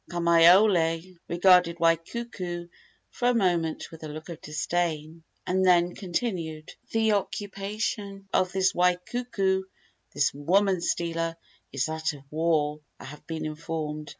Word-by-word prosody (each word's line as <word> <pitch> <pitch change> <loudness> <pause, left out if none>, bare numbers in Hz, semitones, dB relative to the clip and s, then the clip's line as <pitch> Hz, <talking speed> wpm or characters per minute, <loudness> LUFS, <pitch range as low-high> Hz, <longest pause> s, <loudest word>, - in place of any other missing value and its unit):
Kamaiole 170 0 +4
regarded 175 -1 +4
Waikuku 175 +1 -1 0.4
for 245 - -1
a 245 - +3
moment 175 -6 0
with 160 -1 -12
a - - -5
look 155 +3 -8
of 170 - -8
disdain, 160 0 -2 0.2
and 190 +1 +1
then 175 -1 +4
continued: 170 -5 -4 0.2
"The 220 -1 +2
occupation 200 0 -3
of 185 -1 +2
this 190 0 +2
Waikuku 190 +2 0 0.5
this 145 - +1
woman 185 +6 +2
stealer 165 -1 -1 0.4
is 135 0 -1
that 160 0 -2
of 140 -2 -12
war, 155 -2 +1 0.2
I - - -10
have 150 +3 -11
been 160 -1 -4
informed. 155 -1 -5
170 Hz, 125 wpm, -27 LUFS, 160-190 Hz, 0.5 s, Kamaiole